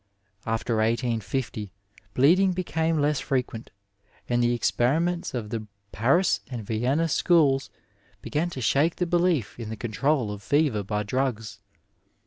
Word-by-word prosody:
After 115 0 -1
1850 115 -1 -1 0.4
bleeding 180 +8 +4
became 165 -3 -1
less 145 -1 +1
frequent, 125 -4 -3 0.6
and 120 0 +1
the 120 0 +2
experimoitB 160 +8 0
of 110 -3 -4
the 110 -2 -4 0.2
Paris 140 - +2
and 120 -5 -6
Vienna 125 +10 0
schools 145 -4 +3 0.5
began 160 +4 -2
to 135 -6 -6
shake 145 +7 +2
the 180 - -1
belief 170 - 0
in 115 -2 -5
the 110 - -5
control 120 +1 0
of 105 -1 -7
fever 140 0 +1
by 105 +1 -2
drugs. 115 -3 -2
130 Hz, 130 wpm, -26 LUFS, 110-155 Hz, 0.6 s, bleeding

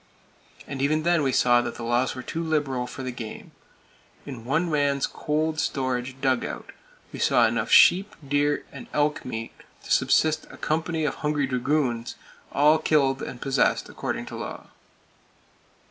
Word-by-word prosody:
And 135 -1 -5
even 155 +3 +1
then 170 -1 +3
we 135 -2 +1
saw 120 -1 +4
that 120 - -5
the 120 - -7
laws 120 +3 +1
were 130 - -6
too 165 - -4
liberal 145 -6 -1
for 130 - -7
the 130 - -3
game. 115 -3 -8 0.7
In 125 -5 -8
one 160 +7 +1
man's 145 -3 +1
cold 155 +1 -2
storage 130 -2 -2
dug 130 -2 +2
out - - -6 0.4
we - - -7
saw - - +4
enough - - 0
sheep, 200 +4 +6
deer 145 +1 +1
and - - -10
elk 150 0 +1
meat 115 -2 -5 0.3
to - - -9
subsist 155 0 +2
a - - -12
company 160 0 -1
of 145 - 0
hungry 150 -1 +1
dragoons, 125 -2 -1 0.4
all 150 +2 +4
killed 140 -4 +2
and 125 - -6
possessed 135 -1 +1
according - - -4
to - - -8
law. - - -7
140 Hz, 160 wpm, -25 LUFS, 130-155 Hz, 0.7 s, sheep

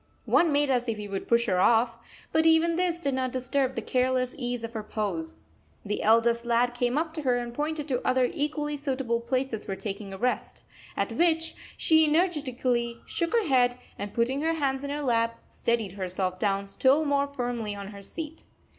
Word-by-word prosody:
One 335 -2 +4
made 290 -1 +2
as 245 -1 +1
if 225 - -1
he 210 -1 -6
would 195 -1 -4
push 235 0 +3
her 185 -6 +1
off, 230 +4 +4 0.4
but 320 0 +3
even 325 +1 +4
this 350 -1 0
did 280 -5 -1
not 260 -1 -1
disturb 260 +1 -1
the 230 - -3
careless 255 +1 +1
ease 245 -3 -3
of 230 0 -5
her 220 - -3
pose. 195 - -4 0.4
The 210 +1 -2
eldest 230 +1 +4
lad 240 +1 +2
came 245 +2 0
up 320 0 -1
to 315 - -4
her 250 -3 +2
and 240 -1 -4
pointed 300 +2 -2
to 250 -2 0
other 255 -1 +3
equally 295 0 -2
suitable 265 -5 -1
places 255 -2 -1
for 195 - -3
taking 200 0 -6
a 195 - -6
rest; 250 +4 -2 0.3
at - - 0
which 325 -1 +1 0.2
she 320 0 +5
energetically 255 -8 0
shook 335 - -1
her 460 -3 +3
head, 250 -4 +3 0.2
and 205 0 -4
putting 250 +5 0
her 325 +1 +1
hands 275 -4 -1
in 280 - -4
her 290 +1 -3
lap, 230 -2 +1
steadied 230 -5 -1
herself 185 -1 -3
down 200 -1 0
still 270 +9 +3
more 285 -1 +2
firmly 245 -6 -3
on 200 -1 -7
her 200 -1 -10
seat. 320 - -7
250 Hz, 200 wpm, -27 LUFS, 230-290 Hz, 0.4 s, she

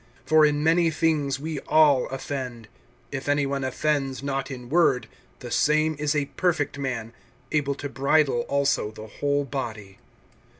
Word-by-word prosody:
(2)For 155 -1 +5
in 145 0 -1
many 165 +1 +4
things 150 -3 0
we 155 0 -4
all 150 -4 +5
offend. 130 -4 -5 0.4
If 135 0 -4
any 145 0 +2
one 140 0 -2
offends 135 0 -1
not 135 0 -2
in 125 -3 -7
word, 145 -3 +2 0.3
the - - -7
same 155 +1 +2
is 150 0 0
a 145 -1 +1
perfect 145 -3 -1
man, 120 -4 -4 0.4
able 140 -2 0
to 145 - -5
bridle 140 0 +2
also 140 -6 +1
the 110 0 -10
whole 145 +6 -1
body. 110 -7 -6
140 Hz, 155 wpm, -25 LUFS, 130-150 Hz, 0.4 s, 2)For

